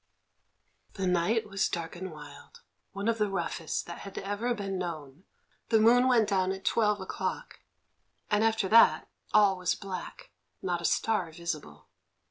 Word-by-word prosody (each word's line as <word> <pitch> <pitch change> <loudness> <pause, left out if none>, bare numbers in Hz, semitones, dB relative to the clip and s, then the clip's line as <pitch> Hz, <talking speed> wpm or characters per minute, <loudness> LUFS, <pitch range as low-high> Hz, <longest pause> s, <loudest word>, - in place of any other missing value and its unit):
That 195 - -3
night 185 +5 +1
was 195 -1 0
dark 165 -1 -4
and 185 +2 -6
wild, 145 -2 -13 0.3
one 200 +2 -4
of 230 -1 +1
the 210 -1 +1
roughest 170 -3 -3
that 170 - -8
had 195 - -10
ever 205 +5 -2
been 195 -3 -4
known. 160 -1 -6 0.4
The 225 - +4
moon 245 +3 +5
went 235 -4 +4
down 190 -2 +1
at 190 -1 -6
twelve 210 -2 +2
o'clock, 190 - -5 0.7
and 210 +1 +3
after 225 -3 +2
that 230 +1 +5 0.2
all 200 -3 +4
was 180 -2 0
black, 195 - -8 0.3
not 175 -2 -1
a - - -4
star 200 -6 +1
visible. 155 - -6
195 Hz, 155 wpm, -29 LUFS, 170-215 Hz, 0.7 s, moon